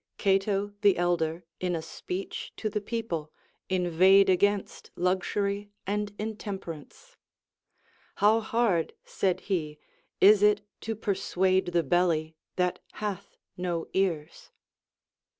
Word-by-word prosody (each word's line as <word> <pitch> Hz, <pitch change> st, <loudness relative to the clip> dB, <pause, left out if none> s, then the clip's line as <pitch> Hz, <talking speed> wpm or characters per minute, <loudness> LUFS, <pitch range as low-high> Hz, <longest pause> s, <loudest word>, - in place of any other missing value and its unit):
Cato 195 Hz, +1 st, +1 dB
the 205 Hz, -2 st, +5 dB
Elder, 170 Hz, -1 st, 0 dB
in 180 Hz, -1 st, -1 dB
a 165 Hz, -, -2 dB
speech 180 Hz, +3 st, -6 dB
to 215 Hz, -, -2 dB
the 210 Hz, 0 st, -1 dB
people, 200 Hz, -9 st, -4 dB, 0.4 s
inveighed 185 Hz, +2 st, +5 dB
against 200 Hz, +2 st, 0 dB
luxury 200 Hz, +3 st, -1 dB, 0.2 s
and 205 Hz, +1 st, -1 dB
intemperance. 205 Hz, -, -7 dB, 1.0 s
How 215 Hz, +2 st, +4 dB
hard, 220 Hz, -6 st, +1 dB
said 185 Hz, -1 st, 0 dB
he, 155 Hz, -6 st, -2 dB, 0.4 s
is 205 Hz, +1 st, +7 dB
it 210 Hz, 0 st, +4 dB, 0.2 s
to 225 Hz, 0 st, -4 dB
persuade 190 Hz, -2 st, +1 dB
the 175 Hz, -1 st, +1 dB
belly, 165 Hz, -3 st, +1 dB, 0.2 s
that 180 Hz, -1 st, 0 dB
hath 200 Hz, -2 st, -5 dB, 0.2 s
no 175 Hz, -2 st, -2 dB
ears 170 Hz, -6 st, -1 dB
190 Hz, 110 wpm, -28 LUFS, 175-205 Hz, 1.0 s, is